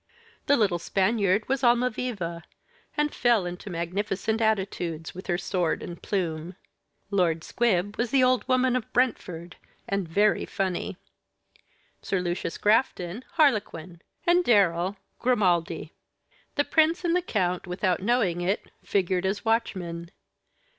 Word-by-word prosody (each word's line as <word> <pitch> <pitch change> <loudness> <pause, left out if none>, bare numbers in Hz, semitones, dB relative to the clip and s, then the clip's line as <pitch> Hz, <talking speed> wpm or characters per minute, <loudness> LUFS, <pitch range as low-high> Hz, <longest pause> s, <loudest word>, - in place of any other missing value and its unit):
The 285 - +5
little 195 -6 +2
Spaniard 200 +2 +1
was 270 -1 0
Almaviva, 240 -8 +1 0.6
and 295 0 +1
fell 235 -6 +3
into 180 +3 -6
magnificent 195 +5 -2
attitudes, 190 -7 -1
with 185 - -9
her 175 - +1
sword 180 -2 -1
and 170 -1 -8
plume. 170 -3 -2 0.6
Lord 170 -5 +1
Squib 205 -4 0
was 235 0 +1
the 265 +1 +4
old 255 0 +2
woman 255 -1 +3
of 250 -3 -3
Brentford, 180 -9 -1 0.3
and 195 -3 -1
very 205 +6 +2
funny. 190 -1 -2 1.0
Sir 190 - -1
Lucius 175 -1 -3
Grafton, 210 -2 +1
Harlequin; 210 - +1 0.2
and 350 +1 +4
Darrell, 190 - +3 0.2
Grimaldi. 190 -8 +1 0.6
The 290 - +3
prince 325 +2 +2
and 340 0 +2
the 360 - +2
count, 180 - -1
without 180 0 0
knowing 200 -5 +1
it, 190 +4 -1
figured 185 -1 0
as 200 +4 -2
watchmen. 175 -7 -1
195 Hz, 125 wpm, -26 LUFS, 175-240 Hz, 1.0 s, The